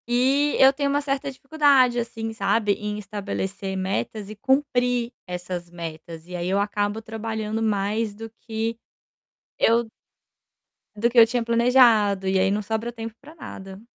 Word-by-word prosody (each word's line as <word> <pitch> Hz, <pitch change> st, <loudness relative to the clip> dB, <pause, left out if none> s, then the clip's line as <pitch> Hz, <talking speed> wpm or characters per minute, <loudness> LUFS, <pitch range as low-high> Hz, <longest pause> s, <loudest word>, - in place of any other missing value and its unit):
E 270 Hz, +4 st, +2 dB
eu 265 Hz, 0 st, +7 dB
tenho 280 Hz, 0 st, -1 dB
uma 285 Hz, +1 st, +1 dB
certa 275 Hz, -1 st, -2 dB
dificuldade 275 Hz, -3 st, +3 dB
assim 225 Hz, -1 st, -4 dB
sabe, 220 Hz, -1 st, +1 dB
em 210 Hz, +1 st, -4 dB
estabelecer 195 Hz, -1 st, -4 dB
metas 195 Hz, -, -3 dB
e 215 Hz, -, -8 dB
cumprir 250 Hz, -2 st, +1 dB
essas 180 Hz, -1 st, -5 dB
metas 165 Hz, -1 st, -8 dB
e 180 Hz, -, -7 dB
aí 175 Hz, 0 st, -2 dB
eu 195 Hz, +1 st, +2 dB
acabo 205 Hz, +1 st, -1 dB
trabalhando 220 Hz, 0 st, -4 dB
mais 210 Hz, 0 st, 0 dB
do 225 Hz, +1 st, -8 dB
que, 225 Hz, 0 st, -3 dB, 0.8 s
eu 230 Hz, 0 st, +3 dB, 1.1 s
do 225 Hz, +3 st, +1 dB
que 240 Hz, -, -5 dB
eu 230 Hz, -, +10 dB
tinha 240 Hz, +1 st, -1 dB
planejado 230 Hz, -5 st, +4 dB
e 190 Hz, 0 st, +2 dB
aí 190 Hz, +1 st, +3 dB
não 210 Hz, +1 st, 0 dB
sobra 220 Hz, +3 st, -3 dB
tempo 225 Hz, -1 st, -7 dB
para 295 Hz, +3 st, -13 dB
nada. 195 Hz, -, -9 dB
225 Hz, 155 wpm, -24 LUFS, 200-245 Hz, 1.1 s, eu